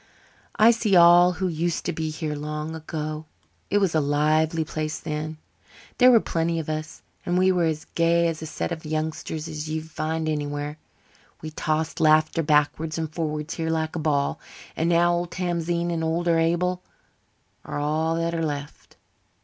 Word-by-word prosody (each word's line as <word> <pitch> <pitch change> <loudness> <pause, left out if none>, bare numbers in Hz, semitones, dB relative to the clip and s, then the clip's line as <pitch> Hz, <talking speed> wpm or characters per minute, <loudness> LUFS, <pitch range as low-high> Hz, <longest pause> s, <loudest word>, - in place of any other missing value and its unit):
I 225 0 +7
see 225 -4 +1
all 175 +1 +7
who 185 +1 -2
used 170 0 -2
to 175 - -1
be 160 0 -3
here 155 -1 -3
long 150 +1 -4
ago. 155 -1 -5 0.4
It 205 - +2
was 195 -4 +2
a 160 - +3
lively 155 +2 +1
place 155 0 -3
then. 155 0 -4 0.6
There 250 0 +8
were 240 -2 +7
plenty 165 -3 -1
of 160 -1 -4
us 155 0 -5 0.2
and 175 0 0
we 185 +1 +4
were 180 -2 +2
as 155 -1 -2
gay 170 0 +3
a 165 - 0
set 160 +2 -5
of 160 -1 -5
youngsters 155 0 -3
as 155 -1 -5
you'd 160 +1 -4
find 160 +1 -2
anywhere. 145 0 -3 0.6
We 155 - -5
tossed 155 +1 -2
laughter 155 +1 +4
backwards 155 +1 +1
and 160 -1 -3
forwards 155 -1 -3
here 160 -1 -3
like 160 0 -1
a - - -2
ball. 145 -2 0 0.4
And 165 +1 0
now 175 0 +4
old 175 0 -1
Tamzine 175 -1 -1
and 165 -1 -2
older 165 +1 +1
Abel 175 +2 +1 0.8
are - - -5
all 155 +3 0
that 165 0 -1
are 165 -1 -1
left." 145 -1 -6
160 Hz, 175 wpm, -25 LUFS, 155-170 Hz, 0.8 s, There